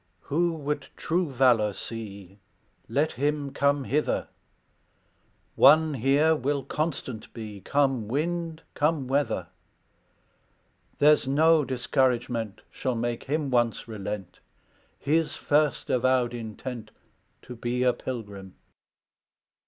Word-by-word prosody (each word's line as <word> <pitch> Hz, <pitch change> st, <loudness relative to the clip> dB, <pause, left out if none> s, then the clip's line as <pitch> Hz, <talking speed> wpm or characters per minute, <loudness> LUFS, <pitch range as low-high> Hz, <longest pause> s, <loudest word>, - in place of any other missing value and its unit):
"Who 170 Hz, +4 st, 0 dB
would 150 Hz, -2 st, -3 dB
true 170 Hz, -2 st, 0 dB
valor 120 Hz, -5 st, +3 dB
see, 100 Hz, -3 st, -8 dB, 0.5 s
Let 150 Hz, +3 st, +1 dB
him 145 Hz, +1 st, -1 dB
come 140 Hz, 0 st, +1 dB
hither; 150 Hz, +3 st, 0 dB, 1.3 s
One 155 Hz, 0 st, +6 dB
here 140 Hz, +5 st, +3 dB
will 140 Hz, 0 st, -1 dB
constant 135 Hz, -7 st, -4 dB
be, 105 Hz, -4 st, -7 dB
Come 135 Hz, -4 st, +1 dB
wind, 165 Hz, +5 st, -2 dB
come 150 Hz, -3 st, 0 dB
weather; 135 Hz, -, 0 dB, 1.5 s
There's 150 Hz, -1 st, +5 dB
no 155 Hz, +3 st, +4 dB
discouragement 125 Hz, -4 st, 0 dB
Shall 130 Hz, -2 st, -2 dB
make 120 Hz, 0 st, -2 dB
him 145 Hz, 0 st, -1 dB
once 120 Hz, -2 st, +1 dB
relent 105 Hz, -3 st, -6 dB, 0.6 s
His 160 Hz, +2 st, 0 dB
first 150 Hz, -2 st, +1 dB
avowed 125 Hz, -1 st, +2 dB
intent 115 Hz, 0 st, -6 dB, 0.5 s
To 125 Hz, -, -9 dB
be 120 Hz, +2 st, -1 dB
a 125 Hz, -1 st, +4 dB
pilgrim. 105 Hz, -7 st, -7 dB
130 Hz, 105 wpm, -27 LUFS, 115-150 Hz, 1.5 s, One